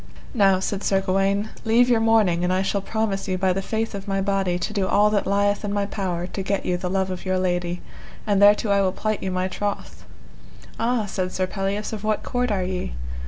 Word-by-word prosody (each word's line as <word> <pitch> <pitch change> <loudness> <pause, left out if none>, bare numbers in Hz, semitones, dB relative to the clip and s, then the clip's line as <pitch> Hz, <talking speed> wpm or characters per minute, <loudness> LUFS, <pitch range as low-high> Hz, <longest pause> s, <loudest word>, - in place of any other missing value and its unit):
Now, 195 -6 +4
said 195 +1 -3
Sir 195 - +2
Gawaine, 195 +2 0
leave 235 +2 +4
your 240 -2 +3
mourning 215 -6 +3
and 180 - +1
I 185 +1 +1
shall 200 +1 -1
promise 205 -1 -2
you 185 - -1
by 185 0 +2
the 195 - -2
faith 225 +3 -2
of 195 0 -6
my 195 -1 0
body 195 -2 0
to 195 +4 -3
do 195 -3 0
all 210 +2 +4
that 205 -2 0
lieth 205 +1 +1
in 205 - -2
my 205 0 0
power 185 -4 -3
to 195 - -5
get 195 +1 -2
you 180 - +1
the 180 0 -3
love 190 0 0
of 185 - -6
your 185 -1 0
lady, 175 -1 -1 0.4
and 205 -2 +2
thereto 205 +1 +5
I 200 0 +4
will 190 -1 +1
plight 215 0 -2
you 190 - -2
my 185 0 -1
troth. 205 +2 -4 0.8
Ah, 230 -1 +1
said 185 -2 -3
Sir 185 - 0
Pelleas, 195 +3 -3
of 215 -1 -5
what 215 -1 0
court 250 0 -1
are 195 -3 0
ye? 180 - -3
195 Hz, 230 wpm, -23 LUFS, 185-210 Hz, 0.8 s, thereto